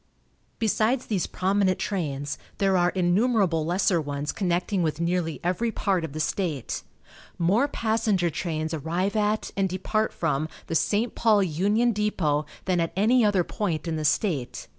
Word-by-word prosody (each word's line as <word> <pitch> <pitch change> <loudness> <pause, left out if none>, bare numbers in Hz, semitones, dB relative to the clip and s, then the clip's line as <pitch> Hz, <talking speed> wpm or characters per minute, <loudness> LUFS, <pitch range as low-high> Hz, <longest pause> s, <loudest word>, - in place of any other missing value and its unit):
Besides 225 +3 +1
these 200 -5 -1
prominent 190 0 +1
trains, 145 -8 -3 0.2
there 195 -1 +2
are 175 -1 +3
innumerable 185 -1 +2
lesser 175 -1 +2
ones 145 0 -3
connecting 180 0 0
with 160 -2 -1
nearly 170 -1 -1
every 185 +7 0
part 195 -5 0
of 160 -4 -5
the 155 - -5
state. 155 - -2 0.6
More 200 +11 +3
passenger 220 - 0
trains 155 0 -3
arrive 170 +7 -1
at, 215 0 0
and 195 -1 +1
depart 215 +4 -1
from, 155 -1 -1 0.2
the - - -5
St. 210 +8 +1
Paul 215 -3 +3
Union 205 +8 +2
Depot 165 -9 0 0.2
than 185 -2 +1
at 165 -1 -1
any 230 +6 +4
other 205 -4 +3
point 170 -4 -3
in 165 - -1
the 155 - -3
state. 145 - 0
185 Hz, 155 wpm, -26 LUFS, 160-210 Hz, 0.6 s, any